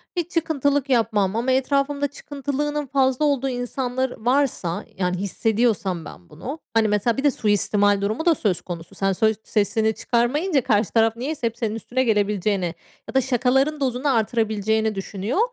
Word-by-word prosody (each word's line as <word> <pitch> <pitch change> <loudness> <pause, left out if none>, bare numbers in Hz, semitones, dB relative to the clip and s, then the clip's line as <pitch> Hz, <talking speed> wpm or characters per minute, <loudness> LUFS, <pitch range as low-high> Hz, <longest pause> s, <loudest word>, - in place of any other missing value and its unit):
Hiç 345 0 -2
çıkıntılık 285 -4 0
yapmam 220 -5 +2
ama 240 +3 0
etrafımda 280 +2 +1
çıkıntılılığının 290 +1 -3
fazla 265 +2 +2
olduğu 275 -2 +1
insanlar 250 +1 -2
varsa, 245 -8 0
yani, 180 -1 0
hissediyorsam 200 -3 0
ben 85 0 -12
bunu, 285 +5 -7
hani, 225 -1 +3
mesela, 210 +2 +1
bir 270 - -1
de 290 - +4
suistimal 205 -2 +2
durumu 215 - -1
da 340 -2 +5
söz 185 - 0
konusu. 170 -2 -8
Sen 195 0 +1
sö 220 +3 +2
sesini 220 +1 +1
çıkarmayınca 270 - +1
karşı 215 -4 +1
taraf 225 -1 +3
niyeyse 265 0 -2
hep 230 0 -6
senin 225 -2 -2
üstüne 245 +3 -1
gelebileceğini 205 -5 +1 0.3
ya - - -8
da 265 - +5
şakaların 265 +4 +1
dozunu 260 0 0
artırabileceğini 220 -1 0
düşünüyor. 200 - -3
235 Hz, 155 wpm, -23 LUFS, 210-275 Hz, 0.3 s, da